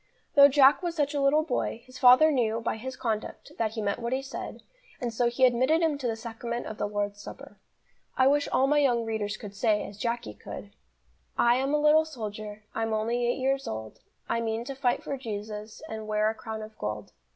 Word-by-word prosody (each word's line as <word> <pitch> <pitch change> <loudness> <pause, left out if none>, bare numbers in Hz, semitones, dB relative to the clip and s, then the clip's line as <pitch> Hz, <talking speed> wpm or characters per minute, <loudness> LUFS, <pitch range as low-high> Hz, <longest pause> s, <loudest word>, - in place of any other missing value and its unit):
Though 280 -1 +9
Jack 280 +2 +5
was 345 -2 -3
such 290 -2 0
a 285 - 0
little 290 +3 +4
boy, 245 -5 -2
his 255 0 -12
father 255 +5 +7
knew, 230 -5 +1
by 230 -1 -2
his 260 +4 -6
conduct, 220 -3 -4
that 220 -1 0
he 220 -2 -3
meant 200 +2 -1
what 235 +1 -2
he 265 +1 -1
said, 270 - -7 0.4
and 240 -2 -3
so 240 +1 +2
he 255 +2 +3
admitted 260 +7 +3
him 320 -3 +2
to 255 - -2
the 225 - -1
Sacrament 235 +1 -5
of 215 - -7
the - - 0
Lord's 205 0 -3
Supper. - - -11 0.6
I 260 - +5
wish 285 +2 +3
all 265 - +3
my 295 +2 +3
young 245 -5 +2
readers 215 -2 -2
could 205 -3 -9
say, 210 0 +1
as 200 0 -12
Jacky 235 - -2
could: - - -9 0.7
"I 240 +1 +4
am 270 +3 +1
a - - +2
little 300 +1 +5
soldier, 215 -6 -7
I'm 225 0 -1
only 235 +3 0
eight 240 - 0
years 270 +1 0
old, 110 0 -6 0.3
I 230 - 0
mean 225 +1 -2
to 275 - -5
fight 255 -2 0
for 275 - -3
Jesus 210 -3 -6
And 220 -1 -6
wear 215 0 +2
a - - -7
crown 220 -1 -6
of 215 0 -11
gold. 105 -1 -4
235 Hz, 220 wpm, -28 LUFS, 215-270 Hz, 0.7 s, Though